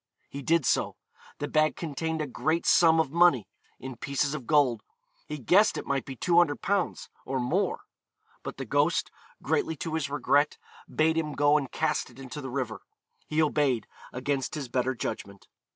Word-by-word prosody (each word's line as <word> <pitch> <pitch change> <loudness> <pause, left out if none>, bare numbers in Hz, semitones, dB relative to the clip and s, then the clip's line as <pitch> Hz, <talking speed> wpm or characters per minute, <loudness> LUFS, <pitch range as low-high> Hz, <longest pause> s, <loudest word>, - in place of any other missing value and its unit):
He 140 - -7
did 165 +1 +2
so. - - +1 0.4
The 145 - -3
bag 155 +1 +2
contained 160 0 -3
'a - - -2
great 155 +5 -1
sum 165 -2 +5
of 155 -4 +1
money,' 170 - +4 0.3
in 130 -2 -8
pieces 140 +3 -1
of 140 -6 -6
gold; 140 -7 +3 0.5
he 150 - -5
guessed 180 - +4
it - - -5
might 135 -1 -1
be 135 - -7
200_l._ 175 +5 +1 0.2
or 135 0 -2
more. 155 +11 0 0.6
But - - -7
the - - -5
ghost, - - +1 0.3
greatly 355 -7 0
to 165 - -5
his 155 -3 -1
regret, 145 +1 +2 0.3
bade 160 +1 +2
him 150 -2 -3
go 145 +1 +3
and 140 -4 0
cast - - -1
it 120 - -18
into 135 +2 -7
the 135 - -6
river. 125 -4 -3 0.5
He 155 +1 +2
obeyed, 140 -6 +1 0.3
against 135 +2 -2
his 140 -5 -5
better 130 +1 0
judgment. 100 -3 -6
145 Hz, 170 wpm, -28 LUFS, 130-160 Hz, 0.6 s, sum